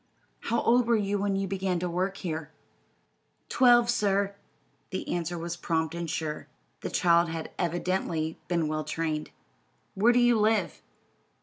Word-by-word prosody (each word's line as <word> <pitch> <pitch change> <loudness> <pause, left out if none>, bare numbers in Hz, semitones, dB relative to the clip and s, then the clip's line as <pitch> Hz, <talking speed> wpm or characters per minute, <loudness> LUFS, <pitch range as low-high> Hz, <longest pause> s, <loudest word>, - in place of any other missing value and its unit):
"How 235 - -1
old 240 0 +3
were 235 - +4
you 205 -1 -1
when 200 0 0
you 195 0 -1
began 190 -1 -1
to 180 +1 -2
work 185 +3 -2
here?" 160 -4 -4 1.0
"Twelve, 240 -2 +5
sir." 200 -4 +1 0.6
The 190 - -4
answer 175 0 -2
was 170 +1 -4
prompt 160 -2 -1
and 170 -1 -4
sure. 155 -1 -3 0.3
The - - -4
child 170 -1 +3
had 165 -1 -5
evidently 170 -2 -1
been 170 -3 0
well 155 0 -2
trained. 155 0 -3 0.6
"Where 220 +4 +4
do 245 - +2
you 240 -2 +4
live?" 210 -6 +1
180 Hz, 150 wpm, -28 LUFS, 165-205 Hz, 1.0 s, Twelve